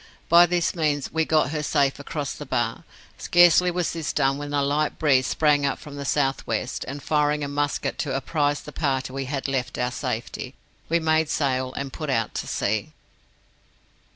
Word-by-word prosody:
By 170 +1 +8
this 175 -1 +1
means 150 -4 -1
we 160 0 +1
got 155 -3 +2
her 155 -1 -2
safe 140 -2 +1
across 145 -1 -4
the - - -8
Bar. - - -1 0.3
Scarcely 175 +1 +5
was 175 -1 -1
this 165 -2 -3
done 135 -1 +1
when 145 0 -5
a 145 -1 +1
light 145 +2 0
breeze 135 -4 +3
sprang 150 -2 +2
up 140 - 0
from 145 -1 -11
the 140 0 -5
south 135 -1 0
west, 115 +3 -2
and 140 +1 -6
firing 150 -1 +1
a - - -2
musket 145 0 -2
to 135 -4 -2
apprize 145 +1 0
the 150 - -10
party 135 -4 -1
we 135 0 -3
had 135 +1 -3
left 130 -2 -2
of - - 0
our 125 - -1
safety, - - -4 0.3
we 170 +1 +3
made 160 -1 +2
sail 130 -4 0
and 140 -1 -5
put 155 -2 -5
out 115 -4 0
to - - -4
sea." - - -1
145 Hz, 195 wpm, -24 LUFS, 135-155 Hz, 0.3 s, By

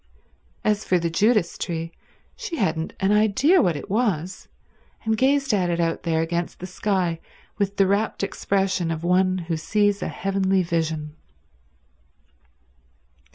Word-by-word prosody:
As 210 0 +1
for 185 - +2
the 170 -1 -1
Judas 210 0 +2
tree, 165 -1 -3 0.4
she 445 -8 -5
hadn't 160 - -1
an 195 +1 +2
idea 220 - +4
what 175 - +2
it 145 - -6
was, 195 -5 -1 0.6
and 220 0 +2
gazed 275 +2 +2
at 185 -4 +1
it 170 0 -1
out 165 -1 0
there 160 -2 0
against 170 +1 -3
the 185 - -7
sky 185 -3 -1 0.4
with 200 0 -1
the 195 - +5
rapt 200 +2 0
expression 195 -2 0
of 165 0 -3
one 185 +1 +2
who 165 - 0
sees 205 +4 +1
a - - -2
heavenly 195 -1 0
vision. 160 -3 -2
190 Hz, 145 wpm, -23 LUFS, 170-210 Hz, 0.6 s, the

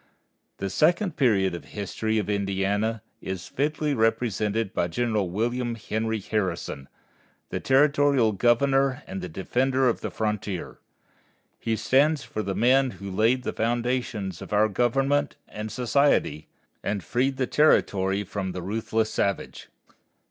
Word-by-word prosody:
The 100 0 -3
second 175 - +2
period 100 -9 +2
of 85 - -5
the - - -20
history 110 +2 -2
of 105 - -1
Indiana 100 +2 -1 0.2
is 95 -2 -5
fitly 150 +1 -1
represented 110 -2 0
by 85 - 0
General 105 0 -1
William 120 +5 -1
Henry 110 0 -2
Harrison, 90 -9 -3 0.6
the - - -3
territorial 140 -3 +3
Governor 130 +5 +2
and 95 0 -6
the 90 - -5
defender 130 +9 +1
of 120 - 0
the - - -3
frontier. 105 -4 -3 0.8
He 115 -1 -1
stands 140 +7 +2
for 110 - -4
the 95 -2 -3
men 130 +5 +4
who 100 -1 -7
laid 115 +6 +2
the - - -3
foundations 115 -5 -1
of - - -9
our 105 +1 +3
government 135 +6 +1
and 105 0 -6
society, 125 - +1 0.3
and 100 -2 -2
freed 130 - 0
the 130 - +1
territory 100 -9 +2
from 95 -2 -4
the 90 -1 -5
ruthless 110 +2 -1
savage. 100 -1 -2
110 Hz, 140 wpm, -26 LUFS, 100-130 Hz, 0.8 s, men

